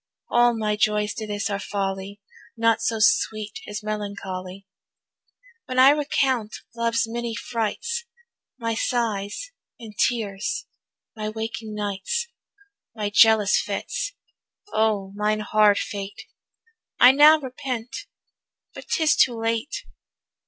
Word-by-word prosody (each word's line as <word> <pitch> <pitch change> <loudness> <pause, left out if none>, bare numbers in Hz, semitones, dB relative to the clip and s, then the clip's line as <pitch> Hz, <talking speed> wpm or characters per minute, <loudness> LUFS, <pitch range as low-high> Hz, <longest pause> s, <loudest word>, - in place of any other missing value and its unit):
All 240 -1 +4
my 210 -1 0
joys 210 0 +1
to 220 - -6
this 205 -1 -2
are 200 -2 -2
folly, 195 0 -4 0.4
Naught 230 0 +3
so 225 - 0
sweet 215 0 +1
as 210 +1 -5
melancholy. 195 -3 -5 1.0
When 255 - -4
I 260 +2 +8
recount 270 -6 0 0.2
love's 230 0 +1
many 235 0 -4
frights, 245 - -3 0.5
My 230 -2 -2
sighs 225 - -2 0.3
and 225 -3 -10
tears, 205 -3 -1 0.5
my 215 -1 -3
waking 220 0 -5
nights, 205 - -2 0.7
My 210 -2 -2
jealous 220 -1 +5
fits; - - -3 0.6
O 210 -3 +1
mine 210 +1 0
hard 210 -1 +4
fate 200 0 -5 0.8
I 250 - +9
now 300 +3 +7
repent, 255 - -5 0.7
but - - -11
'tis 315 -2 +3
too 240 -3 +3
late. 230 +7 -2
220 Hz, 115 wpm, -24 LUFS, 205-240 Hz, 1.0 s, I